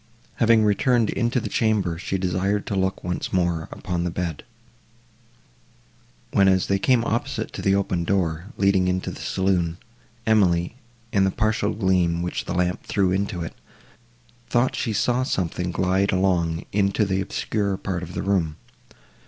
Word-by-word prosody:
Having 115 -2 +4
returned 115 +2 +2
into 120 +2 0
the 115 - -4
chamber, 105 -7 0
she 95 - -2
desired 95 +2 0
to 100 - -3
look 95 0 -1
once 90 0 -3
more 85 -3 0
upon 90 -2 -3
the 90 - -1
bed, 85 -3 -4 1.9
when, 100 -1 +5
as 95 -1 +3
they 100 0 +1
came 120 +1 +3
opposite 115 +2 -2
to - - -5
the 95 0 +3
open 95 -3 0
door, 85 -3 0
leading 100 -2 +3
into 90 0 -1
the - - -9
saloon, 90 -3 0 0.5
Emily, 95 -4 +2 0.4
in 100 - +3
the 95 - +3
partial 110 +1 0
gleam, 90 -4 +1
which 90 - -3
the 85 - -3
lamp 90 0 0
threw 95 -3 0
into 95 -2 -1
it, 80 - -6 1.0
thought 120 +1 +2
she 115 - -1
saw 120 +4 +1
something 90 -7 -1
glide 95 +2 +1
along 85 -3 +1
into 100 +1 +2
the 95 0 0
obscurer 100 0 -2
part 90 -3 -3
of 85 0 -8
the - - -2
room. 90 -6 0
95 Hz, 160 wpm, -24 LUFS, 90-100 Hz, 1.9 s, when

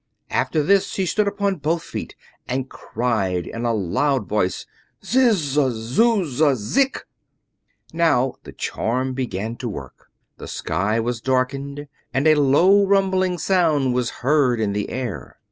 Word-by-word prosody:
After 140 +4 +1
this 195 +5 +3
she 190 - -2
stood 205 +4 +1
upon 200 -1 -1
both 160 +3 -1
feet - - -7 0.3
and 130 +1 -2
cried 100 -7 -2
in 115 +1 -5
a 120 - +2
loud 110 - 0
voice: 100 -3 -1 0.4
"Ziz 245 -3 +4
zy, 145 -3 +1
zuz 175 - +1
zy, 150 -3 +4
zik!" 265 - 0 0.9
Now 145 -6 +2
the - - -11
charm 130 +3 -2
began 115 -3 -4
to 125 - -4
work. 70 - -9 0.3
The - - -9
sky 105 +4 -1
was 115 0 -2
darkened, 135 +3 -1 0.3
and 135 +2 +1
a 155 - +7
low 155 +8 +5
rumbling 190 -2 +2
sound 160 -9 +2
was 125 -1 0 0.2
heard 135 -4 +3
in 105 -2 0
the 105 0 -2
air. 125 -6 -5
135 Hz, 145 wpm, -22 LUFS, 115-175 Hz, 0.9 s, a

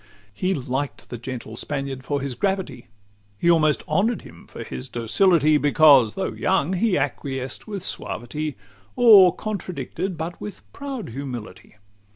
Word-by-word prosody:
XXII 105 - -8
He 190 - +2
liked 135 +1 -4
the 120 - -5
gentle 120 -2 -7
Spaniard 135 0 -4
for 145 0 -2
his 135 -1 -3
gravity; 180 - -2 0.5
He 170 +10 +3
almost 155 -3 +2
honour'd 200 +9 +1
him - - -14
for - - -8
his 65 -1 -7
docility; 155 - +3
Because, 145 -6 +5
though 190 - -2
young, 190 -2 0
he 190 +1 +2
acquiesced 135 - -3
with 200 -4 -5
suavity, 150 0 -4 0.4
Or 210 -7 +8
contradicted 190 -3 -4
but 165 +2 -5
with 210 - -8
proud 275 - -6
humility. 125 -5 -8
150 Hz, 145 wpm, -23 LUFS, 130-190 Hz, 0.5 s, Or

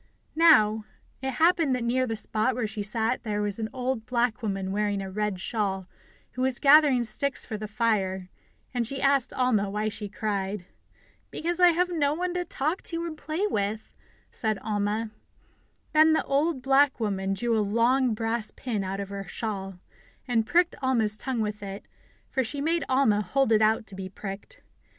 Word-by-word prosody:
Now, 220 -10 +5 0.4
it 265 0 -2
happened 325 -3 +3
that 250 - -3
near 255 +2 +1
the 225 - -2
spot 220 +3 0
where 245 -2 -1
she 215 0 -4
sat 225 +3 0
there 210 -2 -2
was 205 +1 -1
an 220 -1 -2
old 255 -3 -3
black 245 -1 0
woman 195 -3 -2
wearing 205 0 0
a 195 -1 -5
red 210 -1 -2
shawl, 195 -2 -2 0.5
who 255 - -5
was 260 -1 +2
gathering 285 -3 +6
sticks 245 +4 +1
for 220 - -5
the 215 0 -5
fire, 200 -4 0 0.5
and 240 -2 0
she 270 +2 -4
asked 275 -2 +2
Alma 230 -6 +1
why 210 +2 -1
she 205 -1 -6
cried. 200 -2 -3 0.6
"Because 345 +2 -3
I 360 - +8
have 355 +2 +1
no 300 -4 +1
one 355 +1 -2
to 360 0 -1
talk 315 +1 -2
to 335 0 -2
and 330 -2 -5
play 310 +5 -2
with," 210 - -2 0.4
said 220 -2 -1
Alma. 210 +1 -1 0.8
Then 315 +1 +6
the - - +2
old 280 -1 0
black 275 0 +4
woman 195 -3 -1
drew 235 +3 0
a 220 - +2
long 235 +4 +2
brass 225 0 -1
pin 220 -6 -3
out 190 +1 -4
of 200 -1 -5
her 200 0 -6
shawl, 195 -3 -4 0.5
and 225 -3 +1
pricked 350 0 +3
Alma's 230 -5 +1
tongue 240 +1 -2
with 210 -1 -3
it, 195 0 -7 0.4
for 265 - 0
she 280 +5 -3
made 330 +4 0
Alma 260 -6 +3
hold 265 +5 +1
it 220 -1 +4
out 220 +1 +3
to 200 - -4
be 190 -1 -6
pricked. 200 - -8
225 Hz, 185 wpm, -27 LUFS, 210-270 Hz, 0.8 s, I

